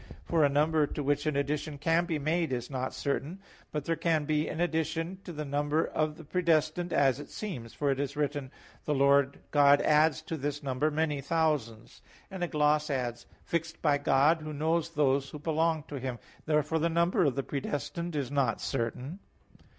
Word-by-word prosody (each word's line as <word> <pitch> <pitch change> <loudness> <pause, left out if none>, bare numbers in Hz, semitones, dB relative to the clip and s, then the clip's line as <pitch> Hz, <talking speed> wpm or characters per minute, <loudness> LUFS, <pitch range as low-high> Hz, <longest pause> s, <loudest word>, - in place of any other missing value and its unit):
For 165 -2 +2
a 145 - +5
number 150 +1 +2
to 145 - -4
which 145 +2 0
an 155 - 0
addition 145 +1 -2
can 165 +4 +2
be 165 -3 -1
made 155 +1 0
is 125 +1 -3
not 130 -1 -2
certain. 145 +5 -2 0.3
But 150 -2 -3
there 165 - +1
can 160 -2 +1
be 155 0 +1
an - - -5
addition 165 +1 -1
to 180 - -6
the 150 -2 -5
number 145 +2 0
of 155 0 -1
the 165 - -10
predestined 165 +1 +1
as 135 -1 +3
it 145 - -9
seems; 130 - -6
for 145 -1 +1
it 135 - -1
is 140 0 -2
written 145 -1 -1
(Deut. - - -21
1:11): - - -24
"The 150 - 0
Lord 140 0 +3
God 145 -1 +6
adds 155 +1 +3
to 160 - -4
this 145 0 -3
number 140 +3 0
many 150 -2 -1
thousands," 140 -7 -1 0.3
and 190 -2 -4
a - - +1
gloss 150 0 +2
adds, 125 -4 -3 0.2
"fixed 165 -1 -2
by 145 -2 +3
God, 145 +4 +3
who 155 0 -6
knows 160 +2 0
those 140 -3 +1
who - - -7
belong 160 +1 0
to 145 -2 -7
Him." 130 -1 -4 0.3
Therefore 150 +1 +1
the 165 +2 +1
number 170 +2 +2
of 140 -5 +2
the 135 - -1
predestined 150 +5 -4
is 140 -3 -2
not 135 -5 +1
certain. 125 - -3
150 Hz, 200 wpm, -30 LUFS, 140-160 Hz, 0.3 s, God